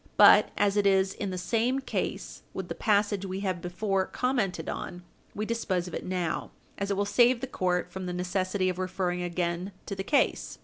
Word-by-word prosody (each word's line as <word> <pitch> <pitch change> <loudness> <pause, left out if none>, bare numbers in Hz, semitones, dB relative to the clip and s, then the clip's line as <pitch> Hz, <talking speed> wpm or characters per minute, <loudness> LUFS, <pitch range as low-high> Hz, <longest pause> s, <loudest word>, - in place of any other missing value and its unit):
But, - - +8
as 205 0 +2
it 205 -1 +4
is 190 0 +3
in 200 - -4
the 185 - -4
same 230 +7 +1
case 270 - -4
with - - -4
the - - -2
passage 205 -2 +1
we 190 0 -4
have 185 -3 -2
before 190 +2 -1
commented 245 -8 -1
on, 175 0 -5 0.3
we 210 - -2
dispose 190 -6 -1
of 180 - -8
it - - -4
now, 180 -3 -2 0.3
as 200 0 -2
it 200 - 0
will 200 - +1
save 240 +4 +4
the 265 - -3
court 180 -7 -1
from 185 0 -5
the - - -2
necessity 185 +1 -1
of 185 0 -1
referring 185 -1 -1
again 175 +1 -2
to - - -4
the 195 - -3
case. 280 +7 +1
190 Hz, 205 wpm, -28 LUFS, 180-205 Hz, 0.3 s, But